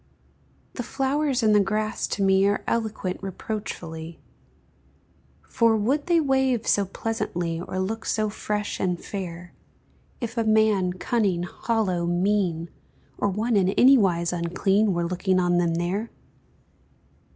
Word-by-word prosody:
The - - -4
flowers 270 +1 0
and 215 -1 +4
the 210 - +6
grass 215 +2 -1
to 200 - -2
me 195 0 +4
Are 205 - 0
eloquent 215 -5 -2
reproachfully; 170 -5 -6 1.3
For 230 -3 +3
would 275 +9 0
they 340 -1 +4
wave 265 -5 +1
so 200 - +2
pleasantly 175 -5 -3
Or 185 - -5
look 210 +4 -3
so 215 -1 +1
fresh 210 0 -3
and 180 -2 -1
fair, 175 -3 -7 0.7
If 235 -1 -3
a - - +2
man, 215 -4 +3
cunning, 185 -2 0
hollow, 185 -2 -1
mean, 175 -2 0 0.5
Or 205 - +1
one 220 +4 0
in 190 -2 +3
anywise 190 -10 +4
unclean, 190 +4 +1
Were 170 0 -1
looking 185 +2 0
on 175 -1 +2
them 170 -1 +1
there? 185 +7 -2
200 Hz, 130 wpm, -25 LUFS, 175-225 Hz, 1.3 s, the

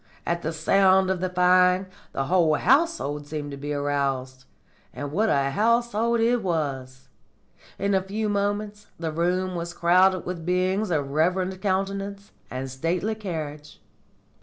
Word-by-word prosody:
"At 170 0 -1
the 160 - -2
sound 190 +4 +3
of 190 - -1
the 185 - 0
firing 180 +1 +4 0.3
the 135 - -2
whole 160 +1 +3
household 250 - +1
seemed 145 -1 -5
to - - -5
be 145 +1 -5
aroused. 135 -3 -2 0.5
And 140 +4 -5
what 215 +8 +1
a 140 -4 +1
household 230 - +1
it 235 +1 +2
was! 135 -8 -3 0.7
In 200 +1 0
a 190 - +3
few 210 +3 -3
moments 205 0 -2
the 165 -1 -3
room 180 +3 0
was 170 0 -5
crowded 185 +2 +3
with 180 -2 -5
beings 185 +4 0
of 145 -5 -1
reverend 185 +5 0
countenance 195 +1 -2 0.2
and 130 +1 -4
stately 170 +10 -1
carriage. 155 -8 -6
180 Hz, 145 wpm, -25 LUFS, 150-200 Hz, 0.7 s, firing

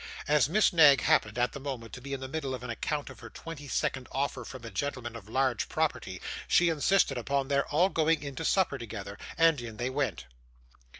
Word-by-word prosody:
As 150 -2 +4
Miss 210 +4 +3
Knag 150 -5 +7
happened, 105 +2 +2
at 120 0 +2
the - - -7
moment, 130 -5 -6
to 125 - -8
be 140 +2 -8
in 135 -1 -3
the 130 - -4
middle 135 -2 -3
of 125 - -9
an 125 - -4
account 145 +4 -3
of 130 - -13
her 115 - -10
twenty 160 -3 -9
second 130 +1 -1
offer 135 -2 -2
from 125 +1 -9
a 115 - -7
gentleman 120 +2 -3
of 110 -2 -10
large 130 -1 0
property, - - -1 0.3
she 175 -1 +4
insisted 160 -3 +2
upon 140 +2 -1
their 140 0 +1
all 175 +6 +3
going 160 -3 +1
in 140 -1 -5
to 165 - -3
supper 170 -6 +2
together; 105 -4 -7 0.2
and 165 -4 +4
in 115 -2 -8
they 125 +3 -2
went. 135 - -2
135 Hz, 220 wpm, -29 LUFS, 120-150 Hz, 0.3 s, Knag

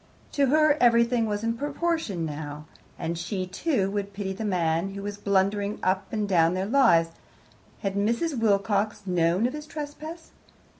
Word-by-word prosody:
To 280 -1 +2
her 305 +1 +4
everything 235 -1 +4
was 205 0 -2
in 230 0 +1
proportion 290 - -2
now, 150 0 -6 0.3
and 165 +1 -3
she, 185 +2 -3
too, 195 - -1
would 200 0 -3
pity 195 -1 -3
the 205 - -6
man 180 -1 0
who 200 - -6
was 205 0 -5
blundering 200 +1 +1
up 190 +1 0
and 215 -2 -1
down 170 -2 +3
their 185 +1 -1
lives. 215 -9 +4 0.7
Had 195 -1 -1
Mrs. 235 - 0
Wilcox 205 -1 +1
known 180 +2 +2
of 250 - -1
his 300 0 -7
trespass? 310 +2 -7
205 Hz, 160 wpm, -26 LUFS, 185-245 Hz, 0.7 s, her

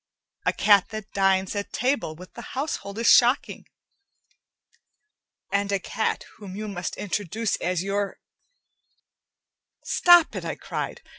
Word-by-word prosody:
A - - +3
cat 200 -2 +4
that 215 -2 -7
dines 195 0 +2
at 205 0 -4
table 250 - -1
with 180 +3 -13
the - - -9 0.2
household 265 -8 -3
is 230 - -2
shocking. 245 +3 +4 1.9
And 200 0 0
a 200 - +2
cat 220 +3 -2
whom 195 -3 -9
you 215 +1 -5
must 185 -3 -5
introduce 205 +2 -2
as 180 0 -1
your 200 0 -2 0.8
" - - -63 0.7
"Stop 350 -2 +5
it!" - - -4
I - - -3
cried. - - -5
200 Hz, 135 wpm, -25 LUFS, 190-225 Hz, 1.9 s, Stop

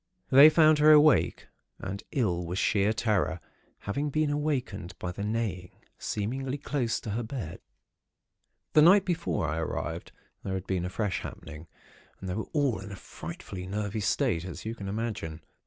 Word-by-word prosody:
They 140 +4 +10
found 155 -1 +5
her 155 +1 +7
awake, 150 0 +5 0.3
and 100 +2 -5
ill 90 -10 0
with 90 +2 -4
sheer 100 +1 +2
terror, 105 -7 0 0.4
having 140 +9 -2
been 155 +1 +1
awakened 130 - -2
by 90 - -4
the 100 +3 -6
neighing, 105 -5 -3 0.3
seemingly 130 +6 -3
close 135 -4 -1
to 105 - -5
her 115 +4 -1
bed. 110 - -6 1.1
"The 155 - +7
night 190 +5 +7
before 170 - -1
I 80 +2 -2
arrived, 80 - -4 0.3
there 95 - -3
had 95 - -4
been 90 -2 -1
a - - -2
fresh 95 -2 -2
happening, 80 +1 -9 0.5
and 95 - -7
they 90 - -2
were 110 +3 -4
all 140 -8 +1
in 95 +1 -8
a - - -6
frightfully 90 0 -8
nervy 105 +2 -3
state, 105 - +1
as 95 +2 -8
you 110 - -3
can 100 -4 -7
imagine. 100 -7 -4
105 Hz, 170 wpm, -28 LUFS, 95-140 Hz, 1.1 s, They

